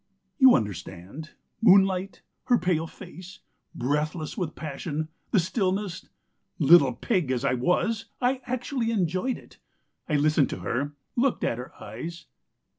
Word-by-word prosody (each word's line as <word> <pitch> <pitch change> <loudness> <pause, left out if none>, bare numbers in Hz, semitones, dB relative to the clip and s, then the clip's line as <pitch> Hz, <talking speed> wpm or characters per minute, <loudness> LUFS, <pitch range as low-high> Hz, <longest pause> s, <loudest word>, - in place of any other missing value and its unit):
"You 260 -2 +8
understand, 100 - -5 0.3
moonlight, 195 -2 +4 0.2
her 245 - +4
pale 170 -4 0
face, 185 +1 -12 0.3
breathless 150 +4 -1
with 175 -7 -3
passion, 155 +1 -4 0.2
the - - +2
stillness... 190 0 -1 0.5
little 140 -3 +6
pig 180 - -1
as 130 0 0
I 130 - +2
was 190 - 0
I 255 +1 +1
actually 250 -1 -2
enjoyed 190 +3 0
it. - - -17 0.5
I 150 - +2
listened 150 0 +3
to - - -5
her, 140 +5 -2 0.2
looked 255 +1 +1
at 115 - 0
her 125 - -7
eyes. 170 -1 -7
175 Hz, 130 wpm, -26 LUFS, 145-205 Hz, 0.5 s, You